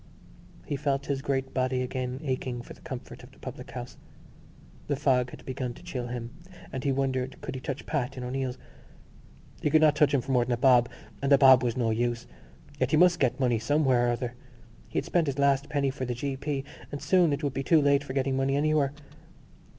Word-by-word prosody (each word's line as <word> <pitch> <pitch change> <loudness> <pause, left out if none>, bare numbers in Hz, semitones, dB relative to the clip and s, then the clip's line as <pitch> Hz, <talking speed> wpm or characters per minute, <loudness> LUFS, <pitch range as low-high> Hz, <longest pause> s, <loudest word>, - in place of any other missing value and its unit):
He 145 - -2
felt 140 0 -1
his 140 -1 -2
great 135 -1 -2
body 130 0 0
again 130 +1 -4
aching 130 -3 -3
for - - -10
the - - -19
comfort 130 -5 -8
of 125 - -13
the - - -21
public 125 -1 -8
house. 125 -1 -7 0.9
The 145 - +1
fog 130 -3 +2
had - - -12
begun 125 -2 -4
to - - -14
chill 130 -9 -4
him 120 -1 -5 0.4
and 130 - -4
he 140 - +1
wondered 130 -1 -1
could - - -5
he 130 - -6
touch 135 +1 -5
Pat 135 -4 -2
in 125 - -5
O'Neill's. 130 0 -3 1.0
He - - +1
could 155 +1 +4
not 150 -1 +5
touch 150 -2 +4
him 140 -2 +2
for 135 - -5
more 125 -2 +4
than 120 +1 -1
a - - 0
bob—and 125 +1 +2
a 140 - +8
bob 130 -2 +7
was 120 -2 -1
no 115 -3 +1
use. 120 +1 -1 0.5
Yet 130 - +1
he 155 - +3
must 175 0 +5
get 130 -1 +1
money 120 -4 +2
somewhere 130 -1 +2
or - - +2
other: 125 0 -4 0.5
he - - -6
had - - 0
spent 170 -3 +1
his 140 -1 -2
last 140 0 +2
penny 140 -3 +1
for 130 -1 -4
the 125 -1 -3
g.p. 135 +2 -3 0.3
and 145 - -4
soon 180 -2 +3
it 145 +2 -2
would 140 -2 -1
be 135 - -2
too 160 +3 +4
late 140 -1 +3
for 130 - -6
getting 135 0 0
money 135 +1 +1
anywhere. 145 -1 +2
135 Hz, 220 wpm, -28 LUFS, 125-140 Hz, 1.0 s, a